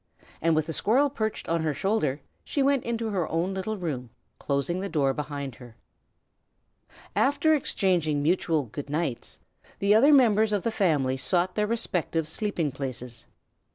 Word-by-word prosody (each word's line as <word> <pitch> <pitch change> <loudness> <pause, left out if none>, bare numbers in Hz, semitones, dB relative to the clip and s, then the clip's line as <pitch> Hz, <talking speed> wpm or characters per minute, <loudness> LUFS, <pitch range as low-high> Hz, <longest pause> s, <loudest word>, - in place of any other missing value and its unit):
And 165 0 +3
with 155 -1 +1
the 160 - -4
squirrel 265 - +2
perched 220 -5 -3
on 165 0 0
her 155 -2 -1
shoulder 155 -6 0 0.2
she 280 - -1
went 275 -2 +2
into 230 -1 -2
her 180 -5 -1
own 170 +4 -1
little 190 +3 -3
room, 140 -9 -4 0.3
closing 140 +6 -1
the 195 +1 -3
door 140 -4 +1
behind 140 -2 -5
her. 120 -3 -13 1.4
After 300 +3 +3
exchanging 175 - +1
mutual 165 -2 +1
"good 140 +5 -8
nights," 150 -5 -3 0.4
the 200 +1 +3
other 260 +8 +6
members 220 -6 +5
of 205 - 0
the 230 - 0
family 150 -11 +1
sought 180 +6 0
their 210 0 0
respective 175 -8 -1
sleeping 165 -3 -2
places. 130 -3 -6
170 Hz, 155 wpm, -27 LUFS, 145-215 Hz, 1.4 s, other